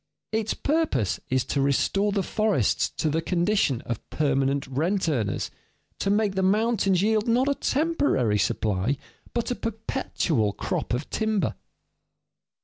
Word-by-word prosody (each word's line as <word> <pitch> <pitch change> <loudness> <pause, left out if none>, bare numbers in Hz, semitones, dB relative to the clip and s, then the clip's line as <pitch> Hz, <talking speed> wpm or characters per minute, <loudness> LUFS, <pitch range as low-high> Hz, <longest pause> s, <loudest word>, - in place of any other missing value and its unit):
Its 220 0 -1
purpose 290 - 0
is 130 -1 +2
to 140 - 0
restore 195 +9 +2
the 195 -1 0
forests 215 +1 +1
to 160 - -2
the 155 +2 +1
condition 175 - +1
of 120 -2 -6
permanent 140 -1 +1
rent 165 +9 0
earners, 115 -10 -1 0.5
to 195 - 0
make 205 -1 +2
the 190 - 0
mountains 200 -1 +2
yield 215 +1 +2
not 245 +3 +3
a 280 - +3
temporary 280 - +1
supply, 105 +7 0 0.4
but 235 +1 -1
a - - 0
perpetual 210 - -1
crop 120 - -2
of 130 +4 -4
timber. 220 -2 0
190 Hz, 140 wpm, -26 LUFS, 135-220 Hz, 0.5 s, not